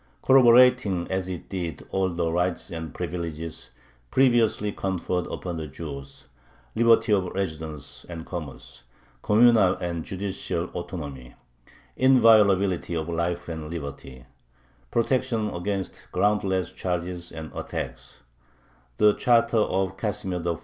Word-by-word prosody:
Corroborating 125 -7 +5
as 95 0 -1
it 90 -2 -6
did 85 -6 -5
all 95 -1 +1
the 85 -1 -1
rights 90 +2 -1
and 80 -2 -5
privileges 85 -2 -5 0.4
previously 120 - +3
conferred 90 -2 -2
upon 90 -2 -5
the 80 -1 -5
Jews 70 -2 -9 0.5
liberty 115 0 +4
of 95 -2 +2
residence 80 -5 -5
and 85 -2 -7
commerce, 80 -7 -8 0.4
communal 110 -3 +5
and 85 -2 -4
judicial 95 -2 -3
autonomy, 70 -8 -7 0.6
inviolability 105 -9 +4
of 80 0 -3
life 85 +1 -2
and 80 -2 -6
liberty, 70 -5 -7 0.6
protection 115 - 0
against 95 +2 -4
groundless 95 -3 +1
charges 90 -1 -4
and 80 -2 -8
attacks - - -6 0.8
the 105 -1 +5
charter 115 0 +3
of 95 -2 0
Casimir 95 -4 -3
IV. 85 -2 -1
90 Hz, 115 wpm, -25 LUFS, 85-105 Hz, 0.8 s, Corroborating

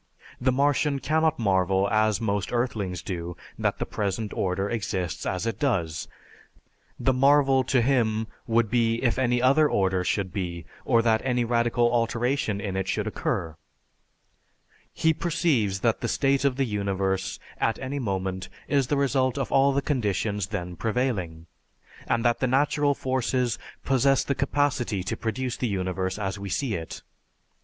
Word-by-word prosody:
The 130 +1 +3
Martian 140 +2 +2
cannot 160 +2 +1
marvel 95 -2 +2
as 110 -1 +2
most 100 -3 -1
earthlings 105 -8 -2
do 85 -2 -5 0.2
that - - 0
the - - -2
present 105 +1 -3
order 95 +1 -1
exists 95 -6 -3
as 90 +3 -2
it 115 -4 -2
does; 85 - -1 0.9
the 130 - +2
marvel 135 0 +4
to 125 -3 +2
him 115 -4 +1 0.2
would 115 -2 +2
be 115 -2 +2
if 120 0 +1
any 125 -1 +1
other 145 +4 +5
order 95 -2 +1
should 95 -1 -1
be 85 -4 -4 0.2
or 115 -2 +3
that 110 -1 +3
any 125 -2 +1
radical 120 0 +2
alteration 115 -1 0
in 100 -1 -4
it 95 0 -2
should - - -1
occur. 80 -2 -2 1.4
He 160 0 +2
perceives 150 - 0
that 115 -2 +1
the 120 - -1
state 140 +2 +1
of 135 -2 +2
the 135 0 +1
universe 100 -3 -1 0.2
at 115 - +1
any 135 +2 -4
moment 95 -5 -3 0.2
is 140 -3 +2
the 145 - +1
result 135 -1 +1
of 135 - -2
all 135 +1 +4
the 140 0 0
conditions 105 - -1
then 90 -4 -4
prevailing, 105 -9 -2 0.6
and 115 +1 0
that 120 0 +3
the 130 - +1
natural 145 +2 +2
forces 130 -2 -1 0.3
possess 135 +1 +3
the 140 - 0
capacity 135 -9 0
to 95 - -2
produce 120 +2 -3
the 125 - -1
universe 95 -1 -2
as 100 -1 -3
we 100 0 -5
see 130 +3 -1
it. 80 -3 -6
115 Hz, 160 wpm, -26 LUFS, 95-130 Hz, 1.4 s, other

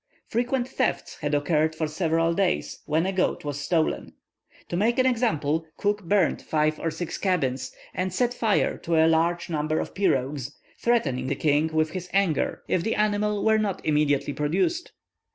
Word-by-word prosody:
Frequent 245 +2 -1
thefts 260 -2 -2
had 145 -1 0
occurred 155 +1 +1
for 160 - -1
several 165 +1 +1
days, 185 0 -1
when 160 +3 +1
a 190 - 0
goat 185 -4 0
was 145 -1 -3
stolen. 160 +2 0 0.6
To - - -2
make 225 +6 +2
an 255 - +3
example, 165 - +1
Cook 205 -1 -1
burnt 200 +3 +2
five 155 0 0
or 165 - -1
six 165 +1 -5
cabins, 135 -9 0 0.2
and 185 0 -2
set 245 +6 +1
fire 225 -4 +1
to 170 - -1
a 160 0 +5
large 165 +2 +2
number 155 -1 -1
of - - -4
pirogues, 140 -6 -1 0.2
threatening 135 - +1
the - - 0
king 150 +1 +2
with 155 0 0
his 180 0 -6
anger 195 -7 +1
if 180 - +1
the 220 +5 -1
animal 210 0 +1
were 220 0 +4
not 205 -3 -2
immediately 145 -2 +1
produced. 190 - 0
165 Hz, 170 wpm, -25 LUFS, 150-205 Hz, 0.6 s, a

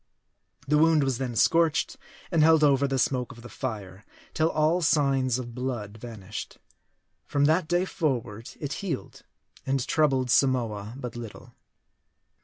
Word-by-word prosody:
The 150 +1 +3
wound 160 -2 +4
was 135 -2 -1
then 125 -3 -3
scorched, 160 +4 +2 0.4
and 165 - +3
held 160 0 +5
over 140 -1 +4
the 135 -1 -1
smoke 125 -1 0
of 120 -2 -13
the 120 - -10
fire, 105 -5 -6 0.3
till 160 +1 +2
all 160 +3 +2
signs 135 -5 +2
of 120 -2 -6
blood 120 -5 -4
vanished. 105 -4 -8 0.7
From 145 0 +2
that 160 +2 +2
day 175 +2 +1
forward 120 - -3
it 145 -1 -4
healed, 170 -9 -5 0.4
and 135 -1 -1
troubled 135 -5 +2
Samoa 115 -6 +1
but 125 -4 -6
little. 115 -3 -9
135 Hz, 145 wpm, -27 LUFS, 120-150 Hz, 0.7 s, held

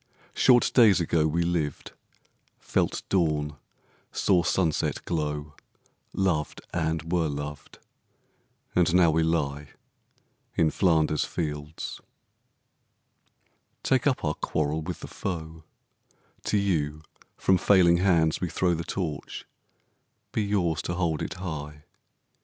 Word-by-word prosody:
Short 125 -2 +4
days 110 -7 +6
ago 80 -2 +2
We 85 +2 0
lived, 85 -4 -2 0.7
felt - - -1
dawn, 75 -5 0 0.5
saw 90 -3 +2
sunset 85 -2 0
glow, 75 -2 -3 0.6
Loved, 90 -6 -1
and 80 -1 -1
were 85 -2 +2
loved, 75 0 -6 1.0
and 85 -1 +3
now 85 -3 +6
we 80 +1 +2
lie 75 -3 -1 0.9
In 80 -2 +3
Flanders 80 -5 +2
fields. 75 -1 -5 1.8
Take 130 +1 +2
up 130 -10 +1
our 75 - +1
quarrel 75 +1 -1
with 85 +1 -6
the - - -7
foe: 80 -3 -6 0.8
To 105 - +1
you 80 -6 0 0.3
from 95 -1 +3
failing 90 -3 +5
hands 85 -4 +2
we 90 - -1
throw 90 +2 +1
The 85 0 -2
Torch: 85 -4 -4 0.9
be - - 0
yours 90 -7 0
to 85 - -3
hold 85 -4 0
it - - -4
high! 75 -5 -6
80 Hz, 115 wpm, -27 LUFS, 75-90 Hz, 1.8 s, days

